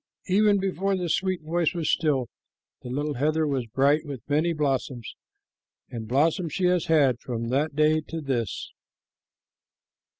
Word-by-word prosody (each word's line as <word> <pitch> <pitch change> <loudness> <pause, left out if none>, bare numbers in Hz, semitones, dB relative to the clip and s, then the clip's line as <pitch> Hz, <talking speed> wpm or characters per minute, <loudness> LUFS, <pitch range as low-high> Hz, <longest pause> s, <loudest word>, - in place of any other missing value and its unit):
Even 205 +2 +4
before 195 0 -1
the 180 -2 -3
sweet 185 -1 0
voice 170 +2 0
was 165 -3 -2
still, 140 -6 +1 0.5
the 125 - -8
little 145 +4 -2
heather 155 +4 +1
was 135 -5 -1
bright 140 +6 +2
with 140 -6 -8
many 155 +4 +2
blossoms, 135 -6 -2 0.8
and 115 -2 -6
blossoms 155 - +1
she 185 - 0
has 180 -2 +2
had 140 -7 +3
from 115 -2 -4
that 140 +3 0
day 155 +1 +3
to 165 - -4
this. 125 - -3
150 Hz, 145 wpm, -26 LUFS, 130-170 Hz, 0.8 s, Even